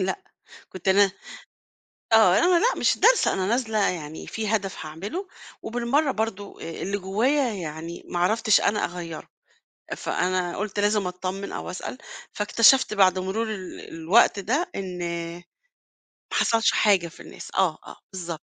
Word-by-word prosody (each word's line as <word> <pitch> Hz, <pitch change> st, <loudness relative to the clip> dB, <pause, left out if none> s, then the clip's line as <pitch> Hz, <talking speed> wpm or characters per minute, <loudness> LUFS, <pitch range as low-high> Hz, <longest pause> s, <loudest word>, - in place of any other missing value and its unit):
لأ، 190 Hz, 0 st, -2 dB, 0.5 s
كنت 185 Hz, 0 st, -9 dB
أنا 195 Hz, 0 st, +5 dB, 1.0 s
آه، 220 Hz, -5 st, +6 dB
أنا 350 Hz, 0 st, +4 dB
لأ -, -, +3 dB
مش -, -, +2 dB
دارسة، -, -, +4 dB
أنا 190 Hz, -1 st, -1 dB
نازلة 225 Hz, 0 st, 0 dB
يعني 160 Hz, -3 st, -5 dB
في 220 Hz, -1 st, -4 dB
هدف 195 Hz, -5 st, -6 dB
هاعمله، 205 Hz, -, -6 dB, 0.3 s
وبالمَرّة 245 Hz, +6 st, 0 dB
برضه 215 Hz, -3 st, -4 dB
آآ، -, -, -5 dB
اللي 200 Hz, +2 st, -2 dB
جوايا 235 Hz, +8 st, +1 dB
يعني 165 Hz, -1 st, -6 dB
ما 175 Hz, -, -3 dB
عرفتش 215 Hz, +4 st, +3 dB
أنا 210 Hz, +1 st, +1 dB
أغيّره، 170 Hz, -3 st, -6 dB, 0.7 s
فأنا 180 Hz, -1 st, -1 dB
قُلت 210 Hz, 0 st, -3 dB
لازم 205 Hz, -1 st, +2 dB
أتطمن 185 Hz, +2 st, -5 dB
أو -, -, -5 dB
أسأل، 185 Hz, +7 st, -6 dB, 0.4 s
فاكتشفت 230 Hz, +4 st, +4 dB
بعد 190 Hz, -2 st, +4 dB
مرور 205 Hz, +5 st, -2 dB
ال 185 Hz, -3 st, -8 dB
الوقت 170 Hz, +6 st, +3 dB
ده 265 Hz, -, -1 dB
إن 185 Hz, -2 st, -5 dB, 1.3 s
ما -, -, 0 dB
حصلش 225 Hz, -1 st, +3 dB
حاجة 195 Hz, -5 st, +3 dB
في 165 Hz, -, -15 dB
الناس، -, -, -10 dB
آه، 180 Hz, -5 st, +2 dB
آه، -, -, -11 dB, 0.2 s
بالضبط. 170 Hz, -4 st, -5 dB
195 Hz, 145 wpm, -25 LUFS, 180-225 Hz, 1.3 s, آه